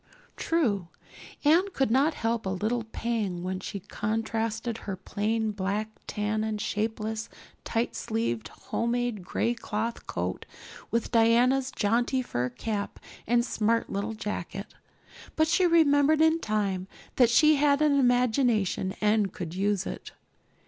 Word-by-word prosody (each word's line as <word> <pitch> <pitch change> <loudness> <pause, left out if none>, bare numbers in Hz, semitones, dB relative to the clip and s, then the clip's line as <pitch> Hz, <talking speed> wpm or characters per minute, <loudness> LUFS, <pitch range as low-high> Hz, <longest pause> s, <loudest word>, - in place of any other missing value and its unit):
True, 225 - 0 0.6
Anne 340 +7 +5
could 270 -7 +1
not 280 +6 +3
help 225 -2 -1
a - - 0
little 215 +5 -1
pang 220 -6 -2
when 185 0 -3
she 200 +1 -6
contrasted 225 +2 -2
her 195 - -5
plain 215 +3 -1
black 205 +2 -2 0.2
tam 210 +1 -1
and 215 -1 -2
shapeless, 220 +1 -2 0.3
tight 230 +1 -1
sleeved, 220 - -2
homemade 235 -3 -2
gray 230 +6 0
cloth 230 0 -4
coat - - -3 0.4
with 230 -1 -1
Diana's 245 +3 +4
jaunty 240 +4 +1
fur 125 - -2
cap 200 - -4 0.3
and 235 +1 +3
smart 230 -1 0
little 205 +3 -2
jacket. 205 -2 -5 0.6
But 315 0 +3
she 355 +3 +3
remembered 305 -2 +4
in 320 +1 +4
time 200 - -1 0.3
that 245 -3 +6
she 305 +5 +5
had 285 0 +3
an 295 -2 +3
imagination 245 -6 +2
and 210 -2 +2
could 165 -2 -6
use 195 0 0
it. - - -7
225 Hz, 135 wpm, -28 LUFS, 205-245 Hz, 0.6 s, that